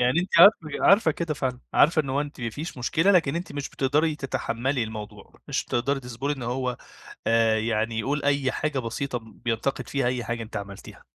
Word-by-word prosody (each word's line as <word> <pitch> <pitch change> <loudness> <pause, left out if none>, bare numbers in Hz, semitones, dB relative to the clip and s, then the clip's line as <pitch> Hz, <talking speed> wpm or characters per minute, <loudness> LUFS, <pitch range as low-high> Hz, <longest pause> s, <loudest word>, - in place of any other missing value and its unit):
يعني 125 +7 +3
أنتِ 180 - -3
عارفة 175 -5 +7
ك - - -5
عارفة 195 -4 +5
كده 160 0 -3
فعلًا؟ 130 -4 -2 0.2
عارفة 155 +1 +5
إن 135 - -5
هو 135 +2 +1
أنتِ 145 -2 -6
ما 115 -1 -2
فيش 150 +3 -7
مشكلة، 165 +9 +2
لكن 165 -6 +3
أنتِ 170 -2 -5
مش 145 -1 -4
بتقدري 150 +3 +1
تَتَحمَّلي 130 -1 -2
الموضوع، 110 -1 -8 0.2
مش - - -1
بتقدري 135 +3 -1
تصبري 125 +3 -3
إن 135 -3 -6
هو 125 +1 -2 0.5
آآ 115 -1 +3
يعني 110 0 -1
يقول 140 +6 -1
أي 140 -2 +2
حاجة 155 -3 -2
بسيطة 125 +2 -3
بينتقد 115 +4 -3
فيها 140 -3 0
أي 125 -2 -1
حاجة 120 +1 -3
أنتِ 110 - -8
عملتيها؟ 100 -1 -8
135 Hz, 200 wpm, -25 LUFS, 115-150 Hz, 0.5 s, عارفة